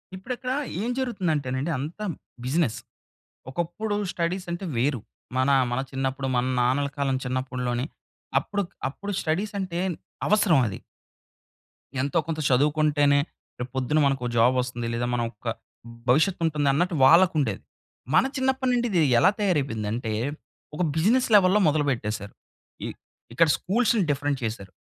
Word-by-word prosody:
ఇప్పుడక్కడ 250 +6 -5 0.3
ఏం 235 - -1
జరుగుతుందంటేనండి 160 - -1
అంతా 160 +10 -5 0.4
బిజినెస్. 135 -2 0 0.7
ఒకప్పుడు 175 +8 -2 0.2
స్టడీస్ 180 +2 -2
అంటే, 175 +3 -4
వేరు. 130 -1 +1 0.4
మన 130 +2 +2 0.2
మన 120 - 0
చిన్నప్పుడు 135 0 -2
మన 125 0 +2 0.2
నాన్నల 135 +3 +1
కాలం 135 -2 +1
చిన్నప్పుడు‌లోని 125 -1 -2 0.5
అప్పుడు 205 0 -2 0.3
అప్పుడు 200 +8 -6
స్టడీస్ 190 +7 -1
అంటే 180 -3 -3 0.5
అవసరం 205 -8 +4
అది. 95 - -5 1.2
ఎంతో 140 +4 +1
కొంత 160 -1 -2
చదువుకుంటేనే, 145 +1 +3 0.4
రేపు 125 - -4
పొద్దున 130 +4 +1
మనకు 135 -2 +1
ఒక - - -1
జాబ్ 125 +3 +5
వస్తుంది. 120 -2 -4
లేదా 120 +1 -1
ఒక 125 - -2
మన 120 - 0 0.9
భవిష్యత్తు 160 +8 +3
ఉంటుందన్నట్టు 155 +3 +1
వాళ్ళకుండేది. 165 -1 +4 0.5
మన - - +6
చిన్నప్పటినుండి 260 -2 +1
ఇది 175 -4 +3 0.2
ఎలా 185 - +6
తయారైపోయింది 140 - 0
అంటే, 115 -2 -3 0.6
ఒక 165 - -3
బిజినెస్ 225 +11 +3
లెవెల్‌లో 195 +1 +6
మొదలుపెట్టేసారు. 120 -9 -1 0.5
ఇ - - -2 0.5
ఇక్కడ 165 +7 +4
స్కూల్స్‌ని 220 - +1
డిఫరెంట్ 145 -1 0
చేసారు. 110 -4 -4
150 Hz, 125 wpm, -25 LUFS, 130-185 Hz, 1.2 s, మన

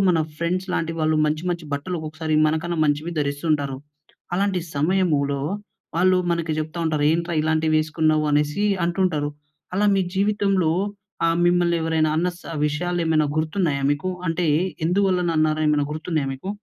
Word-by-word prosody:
మన 170 -2 +3 0.2
ఫ్రెండ్స్ 180 +3 -1
లాంటి 165 0 -1
వాళ్ళు 155 0 +2
మంచి 155 +2 -1
మంచి 170 -2 -3
బట్టలొ 165 +5 -3
క్కొక్కసారి 155 0 -3
మనకన్నా 160 +2 -1
మంచివి 150 +3 0
ధరిస్తూ 145 +2 -2
ఉంటారు. 140 -3 -1 0.6
అలాంటి 195 -1 +1
సమయములో 145 -3 +1 0.6
వాళ్ళు 185 +1 +4
మనకి 170 -2 0
జెప్తా 155 +2 -4
ఉంటారు, 155 -2 0
ఏంట్రా 170 0 -1
ఇలాంటివి 155 0 +1
వేసుకున్నావు 155 0 +1
అనేసి 150 +7 +1 0.2
అంటుంటారు. 170 -5 0 0.4
అలా 205 +2 +2
మీ 190 - +2
జీవితంలో 195 -4 +2 0.6
ఆహ్, 165 0 +2
మిమ్మల్ని 175 -1 +3
ఎవరైనా 160 -1 +1
అన్న 175 +2 +1
స్ - - -18 0.2
విషయాలేమైనా 160 0 0
గుర్తున్నాయా 155 -3 0
మీకు? 145 +6 -1 0.2
అంటే 165 +1 0 0.4
ఎందువల్లన 185 -1 +2
అన్నారు 155 0 +2
ఏమైన 150 -1 +2
గుర్తున్నాయా 155 -2 -2
మీకు? 135 +8 -7
160 Hz, 145 wpm, -23 LUFS, 155-175 Hz, 0.6 s, వాళ్ళు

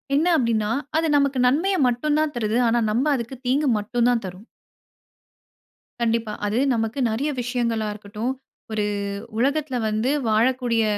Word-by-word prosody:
என்ன 320 +5 +2
அப்படின்னா, 220 -3 +1 0.3
அது 325 0 +1
நமக்கு 280 -2 +1
நன்மைய 335 +10 +2
மட்டும் 295 +5 0
தான் 310 -2 0
தருது. 225 0 0
ஆனா 235 +1 +2
நம்ப 255 +7 +1
அதுக்கு 245 +2 -5
தீங்கு 280 +3 +2
மட்டும் 235 +3 0
தான் 240 -2 +2
தர்றோம். 185 +4 -9 1.5
கண்டிப்பா. 230 -2 0
அது 210 +3 -1 0.2
நமக்கு 225 +4 -2
நெறையா 275 +7 -1
விஷயங்களாருக்கட்டும். 225 -2 -2 0.4
ஒரு 210 -1 0 0.5
உலகத்தில 280 +1 0
வந்து, 215 +4 0 0.2
வாழக்கூடிய 235 0 +2
235 Hz, 130 wpm, -23 LUFS, 220-270 Hz, 1.5 s, என்ன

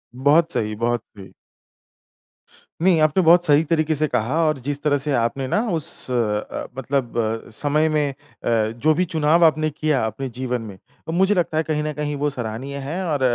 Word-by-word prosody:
बहुत 150 +6 +3
सही, 110 -3 -1
बहुत 120 +1 -1
सही। 95 -1 -11 1.5
नहीं 180 -4 +4
आपने 155 +4 +3
बहुत 175 +2 +6
सही 150 0 +5
तरीके 155 -1 0
से 155 +1 +1
कहा 125 +6 -1
और 155 -2 +1
जिस 145 0 -2
तरह 145 -1 +2
से 145 +2 -2
आपने 130 +2 -1
ना 210 - +1
उस 165 -1 0 0.2
अ, 105 -4 -2
मतलब 135 -2 -2 0.3
अ, - - -14
समय 150 +6 +1
में 150 -2 +1
अ, - - -15 0.3
जो 115 +6 +1
भी 180 +4 +1
चुनाव 160 0 +2
आपने 155 0 +2
किया 150 -3 0
अपने 120 +5 -4
जीवन 125 -2 -2
में, 100 -4 -9 0.3
तो - - -3
मुझे 190 +4 +2
लगता 165 -3 0
है 160 - +2
कहीं 150 -1 -2
ना 155 - -3
कहीं 150 0 -3
वो 145 +1 0
सराहनीय 130 +1 -5
है। 180 +5 -3
और 145 -4 -1
145 Hz, 195 wpm, -21 LUFS, 125-155 Hz, 1.5 s, बहुत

